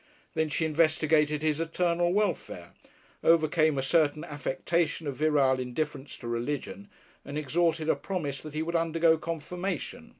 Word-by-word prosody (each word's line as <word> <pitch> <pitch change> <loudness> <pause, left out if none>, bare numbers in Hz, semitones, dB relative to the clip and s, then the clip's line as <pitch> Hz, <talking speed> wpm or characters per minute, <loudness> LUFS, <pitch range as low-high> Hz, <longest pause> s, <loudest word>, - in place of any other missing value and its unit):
Then 160 -1 0
she 160 +2 0
investigated 155 -1 +2
his 155 -1 +1
eternal 175 +1 +1
welfare, 180 - -2 0.5
overcame 155 -2 +3
a 135 - 0
certain 150 0 +2
affectation 155 +3 -1
of 140 -2 -3
virile 145 -4 +3
indifference 130 +3 -4
to 120 - -8
religion, 145 +11 -4 0.3
and 140 +1 -6
extorted 160 +2 0
a - - +3
promise 145 -8 -4
that 155 -1 -9
he 155 - 0
would 170 +1 -3
undergo 165 -1 +3
"confirmation." 170 +1 -4
155 Hz, 140 wpm, -28 LUFS, 145-165 Hz, 0.5 s, overcame